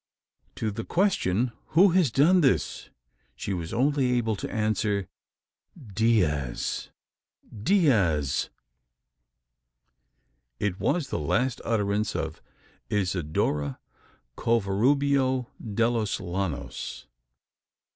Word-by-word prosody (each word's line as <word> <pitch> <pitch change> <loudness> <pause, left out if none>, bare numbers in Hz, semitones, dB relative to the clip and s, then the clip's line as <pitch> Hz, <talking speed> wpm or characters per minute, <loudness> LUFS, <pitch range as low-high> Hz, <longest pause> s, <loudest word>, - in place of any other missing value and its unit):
To 110 - -2
the 115 +3 -5
question, 125 - +1 0.3
"Who 195 +3 +8
has 175 -4 +3
done 160 +10 +4
this?" 135 -4 0 0.5
she 100 - -4
was 85 -3 -4
only 135 0 +2
able 115 -3 +1
to - - -5
answer, 105 -3 0 0.7
"Diaz 100 - 0 0.7
Diaz!" 100 - +2 2.1
It 100 -3 -1
was 165 -6 0
the - - -2
last 120 - 0
utterance 105 -2 0
of - - -4 0.5
Isidora 80 -7 -1 0.6
Covarubio 130 +4 +1
de 115 +1 +1
los 115 -4 -1
Llanos! 90 -5 -4
110 Hz, 85 wpm, -27 LUFS, 95-130 Hz, 2.1 s, Who